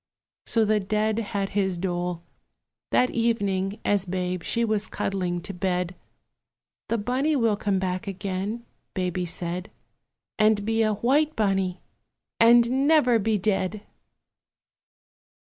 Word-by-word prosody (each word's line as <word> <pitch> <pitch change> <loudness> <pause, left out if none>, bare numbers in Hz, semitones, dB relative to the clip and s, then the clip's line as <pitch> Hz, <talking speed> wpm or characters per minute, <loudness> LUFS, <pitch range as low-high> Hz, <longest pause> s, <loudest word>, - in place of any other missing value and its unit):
So 225 -2 +3
the 215 0 +2
dead 215 +2 0
had 200 -3 -2
his 190 -3 0
dole. 175 -1 -2 0.7
That 250 - +3
evening, 205 -4 0
as 200 -2 +2
Babe 180 0 -2
she 235 +7 0
was 215 -1 0
cuddling 180 -3 -2
to 195 - -6
bed, 180 -1 -1 1.0
"The 230 - +1
Bunny 255 +8 0
will 230 -5 +2
come 200 -2 0
back 185 0 -2
again," 195 +4 -4 0.3
Baby 180 -1 -1
said, 175 +2 -3 0.7
"And 215 -1 +3
be 225 +1 +1
a 215 -1 +2
white 290 +8 +2
bunny, 195 -4 0 0.6
and 240 +4 +5
never 250 -7 +5
be 215 +1 +1
dead!" 200 +1 -1
205 Hz, 125 wpm, -25 LUFS, 185-225 Hz, 1.0 s, and